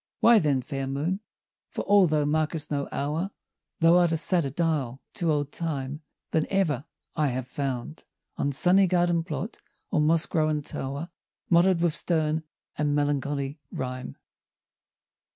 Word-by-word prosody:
Why 230 -1 +7
then, 140 -6 +1
fair 135 0 -4
Moon, 150 +8 -1 0.5
for - - -4
all 200 -3 +5
thou 150 -2 +1
mark'st 155 +1 0
no 140 -1 -1
hour, 155 +7 -2 0.5
Thou 165 +2 +6
art 175 -2 +4
a 165 - +1
sadder 165 -2 +1
dial 145 -5 -1
to 170 -5 0
old 145 -1 -1
Time 150 -3 -3 0.3
Than 160 - +1
ever 160 -9 +1 0.3
I 150 -1 +2
have 130 -1 -2
found 135 +1 -4 0.3
On 140 - 0
sunny 185 +7 +5
garden 175 -2 +2
plot, 185 +5 -5 0.3
or 165 -7 +2
moss 160 +2 +3
grown 155 -3 0
tow'r, 140 +5 -4 0.4
Motto'd 175 +1 +5
with 170 -2 +2
stern 160 -1 0 0.4
and 145 -1 +1
melancholy 145 0 -1
rhyme. 130 - -5
155 Hz, 145 wpm, -27 LUFS, 140-170 Hz, 0.5 s, Why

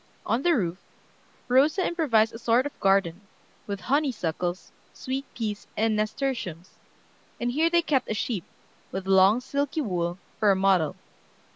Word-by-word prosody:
On 235 - +1
the 345 +2 +3
roof, 180 -4 -1 0.7
Rosa 290 +9 +3
improvised 235 -11 +2
a 225 - -8
sort 240 +3 +2
of 290 - -7
garden, 195 -2 +2 0.5
with 200 -1 -4
honeysuckles, 190 - -1 0.2
sweet 265 +1 -4
peas, 210 -3 -4
and 220 0 +2
nasturtiums, 215 - -3 0.7
and 240 0 -1
here 315 +6 +2
they 340 0 +3
kept 275 -5 0
a 215 - -1
sheep, 210 -4 -2 0.5
with 190 0 -4
long, 195 +4 +5
silky 285 +3 -2
wool, 175 - -2 0.2
for 215 -2 +4
a 195 - +5
model. 190 -5 +2
220 Hz, 145 wpm, -26 LUFS, 190-270 Hz, 0.7 s, long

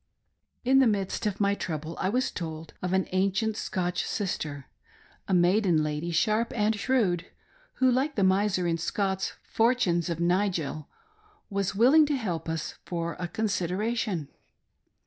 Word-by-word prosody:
In 265 +2 +5
the 265 - +5
midst 205 0 -1
of 205 -2 -3
my 200 -1 +3
trouble 160 -4 -4
I 185 - +1
was 250 +5 0
told 160 -2 -6
of 180 - -2
an 190 0 +1
ancient 195 +4 +1
Scotch 180 -3 -2
sister 150 -8 -3 0.3
— - - -30
a - - 0
maiden 175 -2 +3
lady, 150 +2 -2
sharp 215 +7 +1
and 215 0 +2
shrewd, 205 -7 +1 0.2
— - - -32
who, 260 -1 +3
like 270 +4 0
the 200 - +1
miser 190 -1 +2
in 165 -1 0
Scott's 190 +2 -1
" - - -44
Fortunes 225 -8 +2
of 170 -1 -2
Nigel," 170 -5 0 0.6
was 200 -1 -1
willing 275 +8 +6
to 290 - +1
help 180 -10 -3
us 160 -1 -4
" - - -43
for 170 -1 -3
a 175 - -2
consideration." 200 -2 -1
190 Hz, 165 wpm, -28 LUFS, 170-220 Hz, 0.6 s, willing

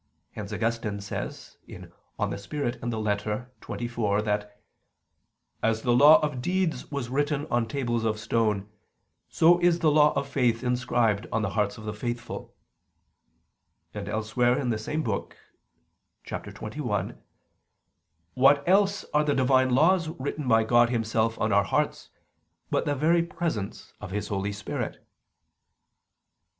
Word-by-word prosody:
Hence 105 -1 -7
Augustine 110 -1 -2
says 100 - -6
(De - - -10 0.6
Spir. 145 +8 -4
et 120 0 -3
Lit. 120 - -2 0.3
xxiv) 115 -1 -3
that 105 -1 -3 1.0
"as 110 0 0
the 120 - +2
law 145 +5 +8
of 130 -4 -4
deeds 180 -2 -1
was 140 -5 -4
written 145 +2 0
on 120 -1 +1
tables 120 -2 -1
of 110 -1 0
stone, 110 -2 0 0.6
so 170 +2 +5
is 175 -1 +3
the 160 -3 +3
law 150 0 +5
of 140 - -1
faith 125 -4 +1
inscribed 120 -4 +1
on 110 - 0
the 100 - -1
hearts 105 -1 0
of 110 - -10
the 105 - -3
faithful": 120 +2 -5 1.4
and 105 -1 -6
elsewhere, 110 +4 +1
in 125 -3 -1
the 110 - -1
same 155 +8 -2
book 110 -6 -3 0.9
(xxi): - - -4 1.2
"What 140 +3 +4
else 200 +1 +3
are 150 0 +4
the 145 -1 +1
Divine 130 0 +3
laws 165 +7 +3
written 145 -1 -4
by 115 -2 +4
God 120 +1 +4
Himself 115 -1 0
on - - +1
our - - +4
hearts, - - -1 0.6
but - - +1
the 145 - 0
very 165 +5 +3
presence 165 - -4
of 105 - -6
His 105 +2 -4
Holy 100 0 -2
Spirit?" 105 +1 -4
120 Hz, 140 wpm, -27 LUFS, 110-145 Hz, 1.4 s, law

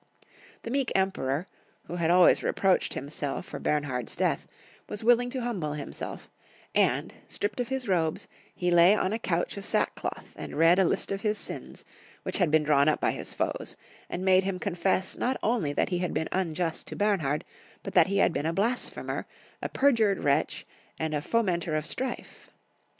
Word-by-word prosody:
The 230 - -5
meek 270 -2 0
Emperor, 180 -6 0 0.4
who 175 - -6
had 165 -1 +1
always 180 0 +6
reproached 190 -2 +1
himself 140 0 -4
for - - -7
Bemhard's 135 -6 -1
death, - - 0 0.4
was 210 +1 -4
willing 245 +1 +4
to 260 0 -3
hmnble 180 -12 -2
liimself, 140 - -6 0.5
and, - - +2
stripped 205 +4 -2
off 245 - -3
his 265 -1 -3
robes, 165 -5 0 0.3
he 180 -1 0
lay 175 +4 +7
on 195 -1 0
a 225 - -1
couch 175 -2 -1
of 200 - -6
sackcloth - - -2
and - - -7
read 165 +3 +5
a 190 - +5
list - - 0
of 195 0 -2
his 210 0 0
sins, - - -3 0.4
which - - -2
had 180 -4 +3
been 155 0 +4
drawn 150 -1 +4
up 155 - +1
by - - +2
his - - -5
foes, - - -2 0.3
and 185 +2 -4
made 190 0 +5
him 190 -1 -2
confess 185 0 0
not 260 +1 0
only 215 -10 +1
that 145 - 0
he 180 - -1
had 180 -1 -2
been 160 - -1
unjust 170 -2 -2
to - - -6
Bernhard, 175 -9 0 0.4
but - - -6
that - - +6
he 200 +1 0
had 190 - +3
been 150 - -1
a - - +1
blasphemer, 230 +7 -1 0.3
a - - -3
perjured 230 -8 +2
wretch, 145 +2 +1 0.3
and 160 -1 -2
fomenter 175 -8 0
of 155 - -3
strife. 260 +7 -5
185 Hz, 185 wpm, -28 LUFS, 160-210 Hz, 0.5 s, lay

